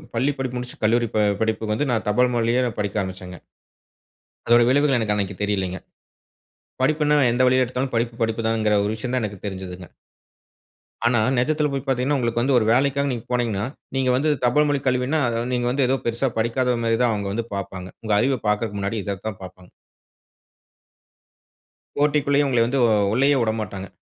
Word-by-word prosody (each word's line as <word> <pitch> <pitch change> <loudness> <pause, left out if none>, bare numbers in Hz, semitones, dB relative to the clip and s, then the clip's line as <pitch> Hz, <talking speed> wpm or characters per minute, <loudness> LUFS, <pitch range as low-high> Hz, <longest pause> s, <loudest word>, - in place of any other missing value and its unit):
பள்ளி 130 +5 +1
படிப்பு 130 -2 -3
முடிச்சு, 125 0 -6
கல்லூரி 115 +2 +2
ப - - +3 0.2
படிப்புக்கு 110 -1 -1
வந்து 145 +5 -1
நான் 115 -2 -1
தபால் 125 +4 +2
வழிய 120 +2 +2 0.2
படிக்க 105 0 -1
ஆரம்பிச்சேங்க. 90 -2 -7 1.1
அதோட 120 0 +6
விளைவுகள் 140 0 +3
எனக்கு 105 -2 0
அன்னக்கி 100 -1 -2
தெரியலைங்க. 95 -3 -1 1.0
படிப்புன்னா, 150 +1 +2 0.2
எந்த 125 +2 +1
வழியில 130 0 +4
எடுத்தாலும் 125 +1 -3
படிப்பு, 115 0 -1
படிப்புதாங்கிற 110 -1 +1
ஒரு 105 - -1
விஷயம் 120 +3 -5
தான் 130 - 0
எனக்கு 105 -2 -7
தெரிஞ்சதுங்க. 95 -2 -7 1.2
ஆனா, 120 -1 +3 0.2
நெஜத்தில 150 +4 +1
போய் 135 - -3
பார்த்தீங்கனா, 135 +1 0
உங்களுக்கு 120 -2 0
வந்து 135 +2 +2
ஒரு 115 - +2
வேலைக்காக 140 +2 +1
நீங்க 120 -3 -4
போனீங்கனா, 115 -5 0 0.3
நீங்க 130 -1 +1
வந்து 145 +5 +1
தபால் 150 +5 +3
மொழி 145 -1 +1
கல்வினா, 130 +4 +1 0.3
நீங்க 120 -1 0
வந்து 135 +1 +1
ஏதோ 135 +2 +1
பெரிசா 120 +3 0
படிக்காதமாரி 115 0 0
தான் 120 - +3
அவுங்க 100 -2 -3
வந்து 115 +2 -2
பார்ப்பாங்க. 95 -1 -6 0.2
உங்க 110 -1 0
அறிவ 130 +3 +1
பார்க்கிறதற்கு 105 -1 -1
முன்னாடி 100 +3 -2
இத 100 -1 -3
தான் 105 -4 -5
பார்ப்பாங்க. 90 -1 -12 2.3
போட்டிக்குள்ளேயே 145 0 +2
உங்களை 125 -4 +2
வந்து 135 +3 0
உ - - +4 0.3
உள்ளேயே 135 +4 +3
விடமாட்டாங்க. 110 -4 -3
120 Hz, 160 wpm, -22 LUFS, 105-130 Hz, 2.3 s, அதோட